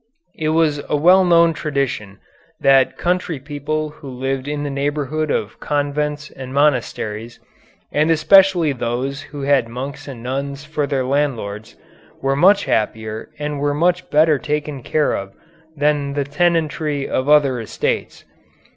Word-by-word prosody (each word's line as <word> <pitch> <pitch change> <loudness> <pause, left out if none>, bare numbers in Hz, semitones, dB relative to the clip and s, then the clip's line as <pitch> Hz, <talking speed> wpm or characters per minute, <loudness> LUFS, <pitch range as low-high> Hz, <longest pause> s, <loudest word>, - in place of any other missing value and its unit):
It 155 -1 -2
was 155 -2 +2
a - - +2
well 180 +5 +6
known 170 -2 +5
tradition 135 -10 -3 0.4
that 135 -1 +4
country 180 -2 -1
people 150 +2 -4
who 145 -2 -11
lived 130 +1 -3
in 145 0 -3
the 145 - -3
neighborhood 145 +2 -2
of 110 -5 -2
convents 150 0 -2
and 130 -1 -9
monasteries, 120 -5 -1 0.5
and 150 +2 +2
especially 175 -1 +5
those 130 +3 -3
who 145 -1 -8
had 135 -4 +3
monks 130 +5 -6
and 125 -4 -8
nuns 140 +2 -4
for 150 -2 -2
their 135 -2 -1
landlords, 120 -7 -2 0.4
were 135 0 0
much 190 +8 +4
happier 110 0 -2
and 150 0 -3
were 145 0 0
much 180 +4 +1
better 155 -1 +4
taken 150 -2 -3
care 150 +5 +1
of 100 0 -6 0.4
than 145 -1 +1
the 145 0 0
tenantry 150 -1 0
of 130 +2 -1
other 140 -4 +4
estates. 110 - -3
145 Hz, 145 wpm, -19 LUFS, 135-155 Hz, 0.5 s, well